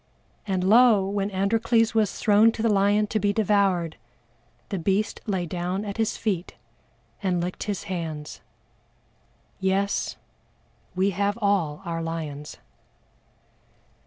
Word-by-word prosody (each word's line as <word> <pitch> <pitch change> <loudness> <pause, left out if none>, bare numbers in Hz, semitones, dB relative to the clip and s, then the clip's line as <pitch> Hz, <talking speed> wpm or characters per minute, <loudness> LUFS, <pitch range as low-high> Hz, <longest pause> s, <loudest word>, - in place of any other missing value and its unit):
"And 190 -2 0
lo! 215 -1 +5
when 200 0 -1
ANDROCLES 225 +4 +1
was 215 -3 +1
thrown 215 +2 +5
to 225 - -4
the 225 -2 +3
lion 205 +1 +3
to 215 +1 -1
be 205 0 +2
devoured, 195 -6 +1 0.7
the 195 - -2
beast 195 +5 0
lay 190 -4 -1
down 180 +4 -3
at 200 0 -5
his 225 -1 0
feet, 195 -5 -2 0.7
and 185 -3 0
licked 180 +1 -4
his 205 -3 -3
hands." 160 -5 -5 1.2
Yes, 195 +1 0 0.8
we 190 +2 +2
have 200 +3 -1
all 195 -6 0
our 165 -1 -3
lions! 155 -3 -5
195 Hz, 125 wpm, -25 LUFS, 180-210 Hz, 1.2 s, lo